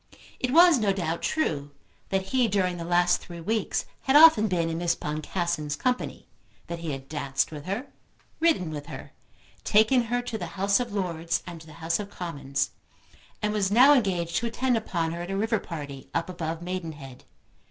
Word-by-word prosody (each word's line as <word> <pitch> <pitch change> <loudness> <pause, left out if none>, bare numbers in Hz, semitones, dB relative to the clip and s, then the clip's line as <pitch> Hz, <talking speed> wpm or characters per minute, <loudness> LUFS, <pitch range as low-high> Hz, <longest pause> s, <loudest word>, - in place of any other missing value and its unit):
It 255 - -1
was 335 0 +7
no 210 -3 +2
doubt 170 -4 -2
true 145 - -1 0.4
that 190 0 0
he, 255 -2 +4
during 185 -3 0
the 170 - -5
last 175 +1 +2
three 170 -1 -9
weeks, 215 +6 -1 0.2
had 265 - +3
often 295 -8 +8
been 175 -4 0
in 165 0 -3
Miss 175 -1 +1
Boncassen's 155 0 -2
company, 250 - -2 0.4
that 170 0 -6
he 165 -1 -5
had 135 -1 -6
danced 140 -2 -1
with 150 -1 -8
her, 200 +8 -3 0.5
ridden 315 - +2
with 145 -1 -6
her, - - -9 0.5
taken 220 +4 +4
her 245 +1 -1
to 230 -2 -4
the - - -4
House 200 +3 +3
of 245 -2 -3
Lords 170 -4 -2
and 170 -2 -8
to 160 - -14
the 155 - -12
House 165 +1 -1
of 205 -1 -5
Commons, 145 -8 -3 0.7
and 210 0 +1
was 200 -3 +1
now 255 +7 +7
engaged 180 -10 +1
to 235 - 0
attend 245 +2 0
upon 170 -7 -1
her 170 +1 -5
at 175 - -6
a 195 - -2
river 220 +1 +1
party 145 -5 -8
up 170 +2 -1
above 165 -1 -4
Maidenhead. 160 -8 -6
180 Hz, 190 wpm, -26 LUFS, 165-220 Hz, 0.7 s, often